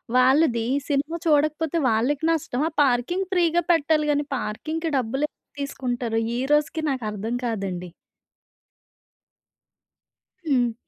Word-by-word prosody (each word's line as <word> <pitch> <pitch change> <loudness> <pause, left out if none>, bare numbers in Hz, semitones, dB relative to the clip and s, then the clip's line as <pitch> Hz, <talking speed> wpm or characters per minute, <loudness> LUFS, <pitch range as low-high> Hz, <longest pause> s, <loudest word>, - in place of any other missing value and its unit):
వాళ్ళది 255 -2 +4 0.2
సినిమా 290 +4 0
చూడకపోతే 310 +1 +2
వాళ్ళకి 255 +7 +1
నష్టమా 305 -1 -1
పార్కింగ్ 285 +9 0
ఫ్రీగా 345 -2 +3
పెట్టాలి 305 -1 +2
గానీ 290 0 0
పార్కింగ్‌కి 315 +10 -3
డబ్బులెందుకు 265 +5 -3
తీసుకుంటారు? 245 -4 -2 0.2
ఈరోజుకి 295 +3 +1
నాకర్థం 225 -2 -3
కాదండి. 190 -6 -3 2.6
హ్మ్. 245 -3 +2
280 Hz, 90 wpm, -24 LUFS, 240-315 Hz, 2.6 s, వాళ్ళది